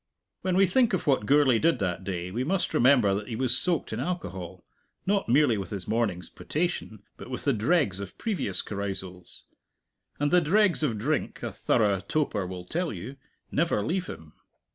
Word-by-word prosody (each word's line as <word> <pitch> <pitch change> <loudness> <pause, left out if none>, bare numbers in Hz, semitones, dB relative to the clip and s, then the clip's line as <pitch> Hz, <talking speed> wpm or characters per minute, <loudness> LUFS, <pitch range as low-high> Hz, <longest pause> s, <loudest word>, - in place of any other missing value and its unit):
When 185 -1 0
we 195 - +6
think 235 +4 +3
of 185 - 0
what 130 -8 +2
Gourlay 140 -5 +5
did 165 -3 +3
that 95 -4 -2
day, 90 -2 -4
we 120 +6 -1
must 180 +6 0
remember 120 -6 +5
that 105 +1 -3
he 115 - -4
was 125 0 +1
soaked 165 -4 0
in 110 - -3
alcohol 95 - -5 0.4
not 195 - +1
merely 125 -4 +4
with 95 - -5
his 100 -3 -5
morning's 105 -6 0
potation, 150 - -3
but - - -10
with 125 - -5
the 140 - +2
dregs 110 - +2
of 100 -2 -8
previous 215 -5 -2
carousals. 95 -3 -6 0.7
And 145 0 +1
the 180 0 +5
dregs 190 +3 +3
of 125 -8 0
drink, 145 +8 -2
a - - -3
thorough 100 -3 +1
toper 105 -2 -1
will 90 -1 -7
tell 170 - -2
you, 110 +8 -7 0.3
never 165 -9 +1
leave 180 +6 -1
him. 80 -1 -9
120 Hz, 185 wpm, -27 LUFS, 100-165 Hz, 0.7 s, we